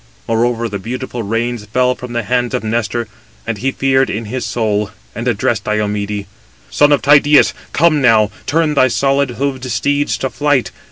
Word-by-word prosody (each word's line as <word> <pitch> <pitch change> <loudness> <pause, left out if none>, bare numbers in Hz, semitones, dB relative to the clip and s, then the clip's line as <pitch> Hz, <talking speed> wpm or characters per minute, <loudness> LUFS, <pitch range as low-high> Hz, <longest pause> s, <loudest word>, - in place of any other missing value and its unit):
Moreover, 115 +1 0
the 100 -2 -5
beautiful 125 +3 -5
reins 115 +2 -2
fell 125 +4 +1
from 125 -1 -9
the 120 -1 -1
hands 125 +3 0
of 125 - -3
Nestor, 115 +1 -2 0.4
and 115 -3 -3
he 135 +5 0
feared 135 0 +1
in 110 +2 -3
his 125 +4 -4
soul, 105 -3 -1 0.2
and 115 +2 -5
addressed 115 -1 0
Diomede: 105 -1 -2 0.5
"Son 145 0 +4
of 145 - +3
Tydeus, 145 +1 +5 0.2
come 155 -2 +3
now, 110 -4 +4 0.2
turn 155 +1 +1
thy 130 -3 +4
solid 135 +4 +1
hoofed 130 +1 -3
steeds 145 +5 0
to 130 - -3
flight. 145 -4 0
120 Hz, 170 wpm, -16 LUFS, 110-135 Hz, 0.5 s, Tydeus